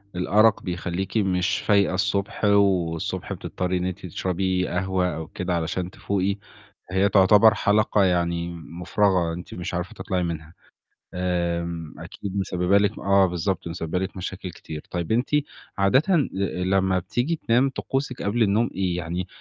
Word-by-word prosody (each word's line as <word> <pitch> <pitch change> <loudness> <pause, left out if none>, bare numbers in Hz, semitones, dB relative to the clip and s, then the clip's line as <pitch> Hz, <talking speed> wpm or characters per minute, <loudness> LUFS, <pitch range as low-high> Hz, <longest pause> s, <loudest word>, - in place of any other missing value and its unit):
الأرق 105 +4 +3
بيخلّيكِ 90 +3 -3
مش 95 -1 +1
فايقة 100 -2 +3
الصبح، 100 +2 -1
والصبح 95 -5 +1
بتضطري 90 0 -2
إن 90 - -2
أنتِ 95 +1 -4
تشربي 90 +1 -1
قهوة 90 -1 0
أو 80 0 -6
كده 90 -1 -3
علشان 85 +2 -2
تفوقي، 100 0 -1 0.6
هي 95 +2 +3
تُعتَبَر 105 +3 +6
حَلَقة 105 -1 +2
يعني 85 -2 +1
مُفرغة، 90 +1 0
أنتِ 90 +1 -8
مش 90 0 -5
عارفة 90 +5 -3
تطلَعي 95 -4 -2
منها. 80 -1 -5 0.6
آمم 85 -2 -2
أكيد 95 +4 -6
مسببة 95 0 +2
لِك 105 +1 +1
آه 100 -1 +4
بالضبط، 90 0 -2
مسببة 85 +1 -3
لِك 95 0 -4
مشاكل 95 0 -5
كتير. 80 -2 -8
طيب 85 +2 -3
أنتِ 120 +4 +1 0.5
عادةً 100 +9 +4 0.6
لمّا 95 0 +2
بتيجي 120 - -1
تنام، 125 +4 +4
طقوسِك 135 -1 -3
قَبْل 115 +4 +1
النوم 110 +3 +2
إيه، 90 -2 0
يعني 90 +2 -3
95 Hz, 140 wpm, -24 LUFS, 90-100 Hz, 0.6 s, تُعتَبَر